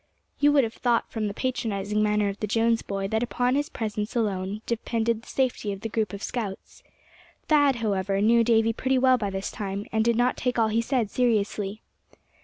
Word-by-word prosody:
You 290 Hz, 0 st, +5 dB
would 280 Hz, -2 st, +5 dB
have 225 Hz, -1 st, -3 dB
thought 240 Hz, -2 st, 0 dB
from 220 Hz, -2 st, -2 dB
the 200 Hz, -, -4 dB
patronizing 215 Hz, -5 st, -1 dB
manner 210 Hz, -1 st, +2 dB
of 200 Hz, 0 st, -4 dB
the 210 Hz, -, -2 dB
Jones 225 Hz, +2 st, +2 dB
boy 195 Hz, 0 st, -3 dB
that 220 Hz, +1 st, 0 dB
upon 245 Hz, +1 st, 0 dB
his 290 Hz, +2 st, 0 dB
presence 215 Hz, -1 st, -4 dB
alone 205 Hz, -2 st, -1 dB
depended 230 Hz, -1 st, -1 dB
the -, -, -19 dB
safety 250 Hz, -5 st, -1 dB
of 195 Hz, -1 st, -6 dB
the 225 Hz, -, -4 dB
group 215 Hz, -3 st, -1 dB
of 200 Hz, 0 st, -7 dB
scouts. 215 Hz, -6 st, -5 dB, 0.6 s
Thad, 290 Hz, -3 st, +4 dB
however, 200 Hz, -4 st, -1 dB
knew 230 Hz, +3 st, +4 dB
Davy 225 Hz, -1 st, +3 dB
pretty 260 Hz, +3 st, 0 dB
well 255 Hz, 0 st, +4 dB
by 205 Hz, -2 st, -1 dB
this 195 Hz, 0 st, -4 dB
time, 200 Hz, 0 st, -4 dB
and 220 Hz, 0 st, +2 dB
did 235 Hz, 0 st, +2 dB
not 245 Hz, +2 st, +1 dB
take 250 Hz, -1 st, -1 dB
all 225 Hz, -1 st, +3 dB
he 225 Hz, +2 st, +1 dB
said 230 Hz, -3 st, -1 dB
seriously. 215 Hz, -3 st, 0 dB
225 Hz, 205 wpm, -26 LUFS, 205-240 Hz, 0.6 s, You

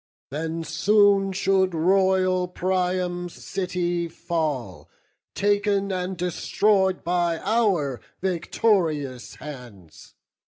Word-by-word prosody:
Then 160 Hz, +3 st, -3 dB
soon 200 Hz, +3 st, +3 dB
should 190 Hz, -1 st, +1 dB
royal 185 Hz, +1 st, +2 dB
Priam's 180 Hz, -1 st, -1 dB
city 175 Hz, -2 st, -2 dB
fall, 155 Hz, -, -3 dB, 0.5 s
Tak'n 205 Hz, -1 st, +1 dB
and 185 Hz, 0 st, -3 dB
destroy'd 190 Hz, +2 st, +1 dB
by 175 Hz, -1 st, +1 dB
our 180 Hz, -, +1 dB, 0.2 s
victorious 165 Hz, -, 0 dB
hands. 120 Hz, -, -11 dB
180 Hz, 80 wpm, -24 LUFS, 165-195 Hz, 0.5 s, soon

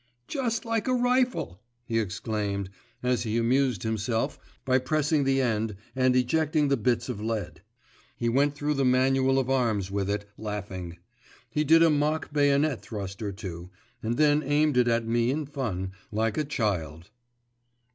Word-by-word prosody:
"Just 235 Hz, -4 st, -2 dB
like 230 Hz, -1 st, -1 dB
a 255 Hz, -, +2 dB
rifle!" 245 Hz, -, +1 dB, 0.2 s
he 115 Hz, -1 st, 0 dB
exclaimed, 100 Hz, -1 st, -3 dB, 0.3 s
as 125 Hz, -1 st, +1 dB
he 110 Hz, -1 st, -1 dB
amused 125 Hz, -2 st, +1 dB
himself 110 Hz, +1 st, -1 dB, 0.3 s
by 130 Hz, 0 st, +3 dB
pressing 150 Hz, +1 st, +1 dB
the 135 Hz, 0 st, +2 dB
end 110 Hz, -4 st, 0 dB, 0.2 s
and 130 Hz, -1 st, +3 dB
ejecting 150 Hz, +3 st, +2 dB
the 140 Hz, -, +4 dB
bits 120 Hz, 0 st, 0 dB
of 100 Hz, -, -4 dB
lead. 110 Hz, -1 st, -3 dB, 0.6 s
He 120 Hz, -, -1 dB
went 140 Hz, +4 st, +2 dB
through 145 Hz, +1 st, -1 dB
the 140 Hz, -1 st, 0 dB
manual 130 Hz, +1 st, +3 dB
of 130 Hz, -2 st, +1 dB
arms 115 Hz, -8 st, 0 dB
with 100 Hz, -1 st, -1 dB
it, 105 Hz, 0 st, -2 dB
laughing; 95 Hz, -5 st, -5 dB, 0.5 s
he 150 Hz, -, +1 dB
did 165 Hz, +2 st, +6 dB
a 165 Hz, -, +5 dB
mock 150 Hz, +1 st, 0 dB
bayonet 145 Hz, -2 st, +2 dB
thrust 100 Hz, -3 st, -6 dB
or 105 Hz, -2 st, -2 dB
two, 90 Hz, -3 st, -7 dB, 0.3 s
and 115 Hz, +2 st, -2 dB
then 150 Hz, 0 st, +4 dB
aimed 150 Hz, 0 st, +2 dB
it 125 Hz, -1 st, +4 dB
at 115 Hz, -1 st, +1 dB
me 115 Hz, +1 st, +1 dB
in 150 Hz, +3 st, -1 dB
fun, 110 Hz, -10 st, -3 dB, 0.2 s
like 110 Hz, 0 st, 0 dB
a 155 Hz, -, 0 dB
child. 90 Hz, -, -2 dB
125 Hz, 165 wpm, -27 LUFS, 105-145 Hz, 0.6 s, did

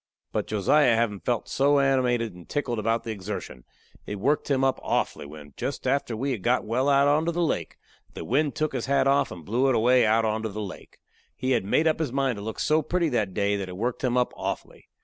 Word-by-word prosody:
But -, -, -2 dB
Josiah 115 Hz, +5 st, +3 dB
havin' 110 Hz, -3 st, 0 dB
felt 120 Hz, +1 st, -2 dB
so 145 Hz, +1 st, +2 dB
animated 125 Hz, -5 st, +1 dB
and 90 Hz, -1 st, -14 dB
tickled 125 Hz, -6 st, -2 dB
about 115 Hz, +2 st, 0 dB
the 115 Hz, -, -4 dB
exertion, 95 Hz, -, -6 dB, 0.4 s
it 105 Hz, -, -4 dB
worked 140 Hz, +11 st, 0 dB
him 135 Hz, -2 st, +2 dB
up 135 Hz, 0 st, +1 dB
awfully 70 Hz, -, -1 dB
when, 75 Hz, -1 st, -12 dB
jest 140 Hz, -, -4 dB
after 130 Hz, -3 st, 0 dB
we 135 Hz, +4 st, -1 dB
had 115 Hz, -7 st, -3 dB
got 120 Hz, +5 st, +1 dB
well 125 Hz, +5 st, +1 dB
out 140 Hz, 0 st, +4 dB
onto 155 Hz, +4 st, +2 dB
the 175 Hz, +1 st, 0 dB
lake, 160 Hz, -, -2 dB, 0.4 s
the -, -, -6 dB
wind 145 Hz, +4 st, +1 dB
took 155 Hz, -2 st, -1 dB
his 130 Hz, -2 st, -3 dB
hat 140 Hz, 0 st, +2 dB
off 140 Hz, +1 st, +3 dB
and 85 Hz, -3 st, -9 dB
blew 125 Hz, +6 st, +1 dB
it 130 Hz, -, +2 dB
away 125 Hz, +2 st, +4 dB
out 110 Hz, +1 st, +3 dB
onto 110 Hz, 0 st, -1 dB
the 105 Hz, +1 st, -6 dB
lake. 100 Hz, -3 st, -8 dB, 0.4 s
He 130 Hz, +1 st, -2 dB
had 120 Hz, -6 st, +1 dB
made 155 Hz, +10 st, +2 dB
up 160 Hz, 0 st, +2 dB
his 155 Hz, -6 st, -1 dB
mind 135 Hz, -3 st, 0 dB
to -, -, -6 dB
look 110 Hz, +2 st, -6 dB
so 155 Hz, +1 st, +2 dB
pretty 170 Hz, +2 st, 0 dB
that 110 Hz, -8 st, -1 dB
day 100 Hz, 0 st, +1 dB
that 95 Hz, -2 st, -5 dB
it 90 Hz, -, -8 dB
worked 120 Hz, +5 st, -2 dB
him 125 Hz, -1 st, +1 dB
up 125 Hz, -, +1 dB
awfully. -, -, -6 dB
125 Hz, 235 wpm, -26 LUFS, 105-140 Hz, 0.4 s, out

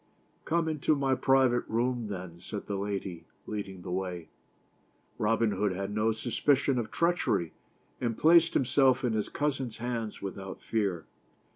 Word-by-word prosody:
" -, -, -38 dB
Come 165 Hz, +1 st, +1 dB
into 155 Hz, -1 st, +1 dB
my 135 Hz, -2 st, +1 dB
private 130 Hz, -2 st, +3 dB
room 120 Hz, 0 st, 0 dB
then," 90 Hz, -4 st, -6 dB
said 100 Hz, +3 st, -6 dB
the 100 Hz, -, -3 dB
lady, 95 Hz, -3 st, -4 dB, 0.2 s
leading 95 Hz, -4 st, -5 dB
the 90 Hz, -, -6 dB
way. 90 Hz, -3 st, -3 dB, 0.9 s
Robin 115 Hz, +1 st, +2 dB
Hood 100 Hz, 0 st, 0 dB
had 100 Hz, +2 st, -4 dB
no 110 Hz, +1 st, +2 dB
suspicion 130 Hz, +4 st, +1 dB
of 110 Hz, -2 st, -3 dB
treachery, 170 Hz, -, +1 dB, 0.5 s
and 115 Hz, -3 st, -1 dB
placed 165 Hz, +1 st, +5 dB
himself 130 Hz, 0 st, +3 dB
in 120 Hz, -3 st, +1 dB
his 110 Hz, -1 st, -1 dB
cousin's 135 Hz, -6 st, -2 dB
hands 115 Hz, -2 st, -3 dB
without 95 Hz, -1 st, -6 dB
fear. 100 Hz, -7 st, -1 dB
110 Hz, 150 wpm, -30 LUFS, 100-130 Hz, 0.9 s, placed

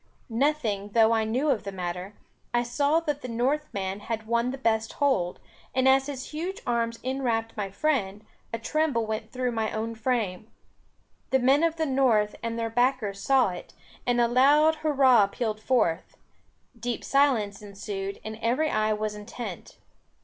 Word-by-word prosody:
Nothing 225 Hz, -6 st, 0 dB
though 225 Hz, -1 st, +5 dB
I 225 Hz, -1 st, +2 dB
knew 255 Hz, +7 st, +1 dB
of 240 Hz, -, 0 dB
the 200 Hz, -, -5 dB
matter, 180 Hz, +1 st, -5 dB, 0.4 s
I 240 Hz, -, +3 dB
saw 285 Hz, +6 st, +1 dB
that 295 Hz, -3 st, -2 dB
the -, -, -6 dB
North 260 Hz, +6 st, -1 dB
man 195 Hz, 0 st, -3 dB
had 220 Hz, +1 st, -4 dB
won 235 Hz, +2 st, +1 dB
the 265 Hz, -, -4 dB
best 220 Hz, -3 st, 0 dB
hold, 260 Hz, -12 st, 0 dB, 0.4 s
and 260 Hz, 0 st, +3 dB
as 265 Hz, +1 st, +4 dB
his 275 Hz, -2 st, -6 dB
huge 345 Hz, +5 st, -4 dB
arms 230 Hz, -1 st, 0 dB
enwrapped 240 Hz, -4 st, -1 dB
my 205 Hz, -2 st, -3 dB
friend, 205 Hz, -3 st, -1 dB, 0.3 s
a 230 Hz, -, -2 dB
tremble 265 Hz, -1 st, 0 dB
went 220 Hz, 0 st, -4 dB
through 250 Hz, 0 st, -1 dB
my 220 Hz, -2 st, -1 dB
own 225 Hz, +1 st, -3 dB
frame. 220 Hz, -4 st, -2 dB, 0.8 s
The 265 Hz, -, +4 dB
men 265 Hz, +3 st, +4 dB
of 330 Hz, -1 st, +2 dB
the 320 Hz, -1 st, 0 dB
North 250 Hz, -7 st, +2 dB
and 230 Hz, 0 st, -3 dB
their 230 Hz, -1 st, -2 dB
backers 245 Hz, -4 st, +1 dB
saw 265 Hz, -1 st, +3 dB
it, 180 Hz, -, -9 dB, 0.3 s
and 245 Hz, 0 st, +2 dB
a 235 Hz, -, +4 dB
loud 290 Hz, +6 st, +5 dB
hurrah 270 Hz, -8 st, +4 dB
pealed 215 Hz, +1 st, -3 dB
forth; 215 Hz, -9 st, 0 dB, 0.6 s
deep 240 Hz, 0 st, -3 dB
silence 240 Hz, -8 st, +2 dB
ensued, 200 Hz, -1 st, -6 dB
and 220 Hz, 0 st, -6 dB
every 260 Hz, +7 st, +1 dB
eye 215 Hz, 0 st, +1 dB
was 215 Hz, 0 st, -2 dB
intent. 210 Hz, -2 st, -8 dB
230 Hz, 170 wpm, -27 LUFS, 215-265 Hz, 0.8 s, though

